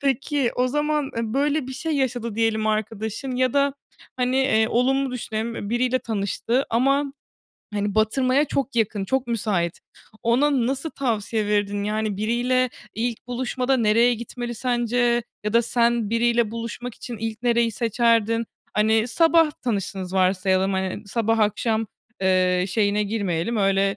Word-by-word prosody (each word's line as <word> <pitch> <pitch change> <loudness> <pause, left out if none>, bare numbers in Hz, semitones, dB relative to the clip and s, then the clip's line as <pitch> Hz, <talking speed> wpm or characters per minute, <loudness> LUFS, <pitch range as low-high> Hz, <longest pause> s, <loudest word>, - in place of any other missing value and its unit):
Peki, 275 -1 0
o 250 +1 +2
zaman, 295 +1 0
eee, 230 - 0
böyle 290 0 +1
bir 265 - -6
şey 315 +5 -3
yaşadı 245 -5 -1
diyelim 220 -1 +1
arkadaşın 220 +4 -2
ya 255 -1 +2
da 280 -1 +2 0.4
hani, 250 +1 +1
eee, 230 -5 +3
olumlu 265 +2 +1
düşünelim, 230 -2 -4
eee, 205 - -5
biriyle 250 +2 +1
tanıştı 225 +4 -1
ama, 275 +4 +2 0.6
hani, 205 -1 -1
batırmaya 255 +6 +2
çok 275 -3 -2
yakın, 210 -3 0
çok 265 +5 -1
müsait. 200 -7 -1 0.4
Ona 250 +1 +2
nasıl 275 +4 -2
tavsiye 220 -4 -1
verirdin? 205 -1 0
Yani 215 -1 -1
biriyle 245 +4 +1 0.2
ilk 235 +1 -3
buluşmada 255 +1 -1
nereye 230 +2 +4
gitmeli 240 +1 -6
sence 240 0 +1 0.2
ya 210 - -1
da 235 0 +4
sen 235 -2 +1
biriyle 235 -1 +2
buluşmak 230 +1 -6
için 240 -2 -7
ilk 225 +1 -4
nereyi 235 -1 +2
seçerdin? 230 0 +2 0.3
Hani, 220 +2 +2
sabah 325 +4 +4
tanıştınız 195 -5 -2
varsayalım, 190 +1 +2
hani, 190 +2 -3
sabah 225 +1 0
akşam, 220 +1 +1 0.3
eee, 185 -1 +2
şeyine 205 +1 +1
girmeyelim. 205 -1 -1
Öyle 195 0 +2
230 Hz, 145 wpm, -23 LUFS, 210-255 Hz, 0.6 s, nereye